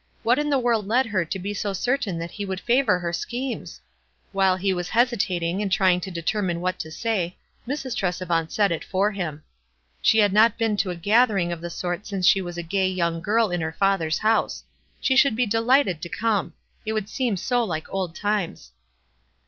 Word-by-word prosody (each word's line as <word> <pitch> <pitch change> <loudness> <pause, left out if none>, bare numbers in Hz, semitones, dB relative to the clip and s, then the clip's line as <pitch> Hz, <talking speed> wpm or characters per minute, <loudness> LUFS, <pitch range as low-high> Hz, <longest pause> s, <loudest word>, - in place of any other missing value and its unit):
What 245 +4 +3
in 295 0 0
the 280 - +3
world 235 -5 +1
led 250 +5 +3
her 200 -6 0
to 175 - -4
be 200 +2 -4
so 205 -1 -2
certain 230 -2 -1
that 170 +1 -5
he 205 - -5
would 190 -1 -4
favor 240 -4 +2
her 175 -1 -3
schemes? 245 +8 -4 0.5
While 190 -1 +2
he 190 0 0
was 180 -1 -3
hesitating 195 -7 +1
and 200 -2 -2
trying 180 -1 +3
to 190 - -5
deter 175 +4 -2
mine 175 -3 -1
what 185 +1 -2
to 160 - -5
say, 185 -1 -2 0.3
Mrs. 265 -3 -3
Tresevant 175 -5 -1
said 205 -3 +2
it 165 - -2
for 200 +3 +1
bim. 160 -7 -5 0.6
She 220 - +4
had 205 -3 +4
not 220 +1 +5
been 225 -2 +1
to 195 - 0
a 180 - -3
gathering 205 -1 +2
of 170 -1 -5
the 175 - -5
sort 175 +3 -4
since 195 -3 -2
she 195 - +5
was 175 -1 -6
a 175 - -3
gay 190 +3 0
young 170 -3 -1
girl 215 +2 +2
in 175 -1 -1
her 160 0 -3
father's 180 -5 +1
house. 220 +1 +1 0.4
She 265 - +1
should 275 -4 +5
be 250 +2 +2
delighted 225 - +2
to 170 - -6
come; 210 -6 -1 0.3
it 220 - -2
would 215 -2 -2
seem 240 -4 -1
so 245 +6 +1
like 160 -7 -3
old 185 -3 -2
times. 205 -3 -2
195 Hz, 210 wpm, -24 LUFS, 175-225 Hz, 0.6 s, not